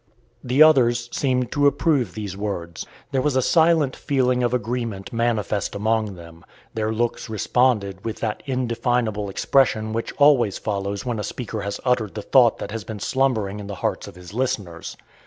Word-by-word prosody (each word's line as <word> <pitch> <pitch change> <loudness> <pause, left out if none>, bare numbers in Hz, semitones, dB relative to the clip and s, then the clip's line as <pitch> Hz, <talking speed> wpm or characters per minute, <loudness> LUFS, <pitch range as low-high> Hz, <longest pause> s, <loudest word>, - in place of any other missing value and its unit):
The 130 +5 +5
others 120 -6 +4
seemed 125 -3 0
to 145 0 +3
approve 140 - +1
these 105 -3 -5
words. 95 -5 -5 0.2
There 135 -2 +1
was 145 0 0
a 130 - +3
silent 160 -4 +3
feeling 125 -3 +1
of 120 -1 +1
agreement 115 -4 -3
manifest 110 -4 -1
among 110 -1 0
them; 85 -1 -13 0.3
their 110 0 -1
looks 115 +1 -2
responded 105 -3 +1
with 115 - -4
that 110 -2 -2
indefinable 120 -4 -1
expression 110 0 +1
which 115 +1 -3
always 140 -8 +4
follows 100 0 -3
when 120 -3 -2
a - - -3
speaker 115 -1 -5
has 100 0 -4
uttered 120 -5 0
the 105 - -5
thought 120 -4 +4
that - - -6
has 110 -1 -5
been 110 -2 -7
slumbering 110 -6 0
in 100 - -7
the 100 - -5
hearts - - -2
of - - -11
his 90 +1 -12
listeners. 110 -9 -3
115 Hz, 175 wpm, -23 LUFS, 100-125 Hz, 0.3 s, The